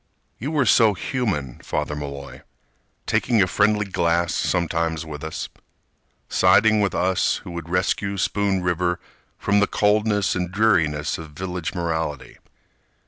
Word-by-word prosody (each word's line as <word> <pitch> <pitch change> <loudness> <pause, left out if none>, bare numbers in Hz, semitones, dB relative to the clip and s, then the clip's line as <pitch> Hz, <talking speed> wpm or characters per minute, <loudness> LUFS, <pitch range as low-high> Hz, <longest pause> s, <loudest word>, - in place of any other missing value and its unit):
You 135 - -3
were 150 -4 +1
so 110 -2 +5
human, 90 - -2
Father 75 - -3
Malloy, 70 -2 -7 0.6
Taking 115 - +1
a 100 - +5
friendly 105 +3 +2
glass 85 -2 0
sometimes 85 -2 -1
with 75 -2 -8
us, 80 0 -4 0.8
Siding 105 +4 +4
with 100 -2 0
us 95 0 +1
who - - -8
would 85 -1 -7
rescue 100 +2 0
Spoon 95 0 0
River 90 0 0 0.4
From 100 0 +2
the 100 - +3
coldness 105 -1 +2
and 90 -1 -1
the 90 - -15
dreariness 80 -10 +1
of 80 -2 -10
village 90 +1 -4
morality. 80 -5 -3
90 Hz, 140 wpm, -23 LUFS, 80-105 Hz, 0.8 s, so